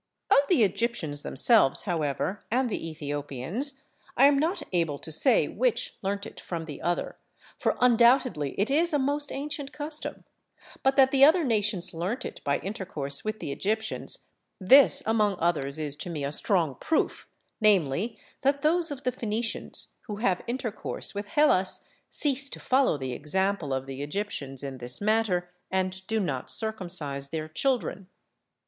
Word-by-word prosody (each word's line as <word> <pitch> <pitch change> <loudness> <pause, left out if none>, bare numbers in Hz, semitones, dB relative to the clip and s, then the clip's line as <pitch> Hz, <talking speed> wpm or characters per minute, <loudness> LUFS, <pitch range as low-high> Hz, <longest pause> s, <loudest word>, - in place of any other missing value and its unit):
Of 275 - +7
the 305 -11 +5
Egyptians 200 -8 -1
themselves 215 - +3
however 170 +2 -2
and 250 +1 +1
the 165 - -3
Ethiopians, 150 - -4 0.3
I 265 - +7
am 280 -1 +5
not 330 +2 0
able 165 -5 +1
to 160 - -9
say 250 - +3
which - - -1
learnt 200 +1 -4
from 165 -2 -5
the 145 -3 -8
other, 175 0 -2 0.4
for - - 0
undoubtedly 235 - +3
it 210 +7 +1
is 325 +3 +2
a - - +4
most 285 +1 -1
ancient 285 0 -5
custom; 300 +1 -6 0.6
but 270 0 +2
that 265 -1 +5
the 275 -1 +5
other 320 +4 +6
nations 210 - 0
learnt 185 +10 -3
it - - -8
by 140 - +1
intercourse 185 -9 -2
with 215 0 -3
the - - -4
Egyptians, 220 +7 -2 0.3
this 275 +7 +7
among 215 -3 +2
others 155 -5 0
is 150 -2 -3
to 175 - -5
me 155 -4 -4
a 140 - -2
strong 165 -2 +1
proof, 320 - -1 0.3
namely 200 - +2 0.2
that 280 +1 +1
those 335 +2 +3
of 285 -2 -6
the 250 - +1
Phenicians 225 -1 -2 0.2
who 210 - -4
have 195 -4 0
intercourse 235 -3 -4
with 205 0 -5
Hellas 205 -8 +3 0.3
cease 275 -1 +1
to - - -8
follow 260 - +2
the 130 -2 -4
example 180 +2 -1
of 130 0 -2
the 135 0 -7
Egyptians 145 -5 -3
in 135 -2 -6
this 125 +1 0
matter, 205 -4 +1 0.2
and 190 0 -1
do 220 0 0
not 140 -10 -3
circumcise 175 -11 -1
their 155 0 -4
children. 200 - -1
205 Hz, 160 wpm, -27 LUFS, 155-260 Hz, 0.6 s, Of